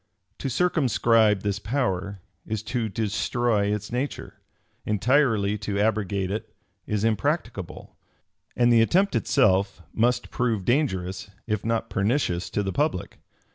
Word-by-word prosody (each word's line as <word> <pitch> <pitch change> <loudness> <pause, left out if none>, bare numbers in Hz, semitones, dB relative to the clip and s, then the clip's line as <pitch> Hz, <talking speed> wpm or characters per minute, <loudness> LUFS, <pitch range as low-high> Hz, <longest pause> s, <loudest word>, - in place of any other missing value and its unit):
To 135 - -2
circumscribe 115 - +3
this 100 0 -1
power, 100 -4 -2 0.2
is 110 0 -4
to 115 -1 -2
destroy 110 +1 0
its 105 +1 -3
nature: 130 +4 -4 0.4
entirely 105 -2 +2
to 100 -1 -3
abrogate 100 -3 0
it, 105 - -5 0.3
is 105 -1 -1
impracticable; 115 - -2 0.6
and 120 -1 +4
the 115 - +6
attempt 185 - +2
itself 95 -3 +2
must 120 +2 +1
prove 115 -7 -1
dangerous, 95 -9 0 0.2
if 105 -3 -2
not 115 0 -1
pernicious 100 -4 0
to 105 - -1
the 95 -1 -3
public. 145 - -1
110 Hz, 125 wpm, -25 LUFS, 100-120 Hz, 0.6 s, the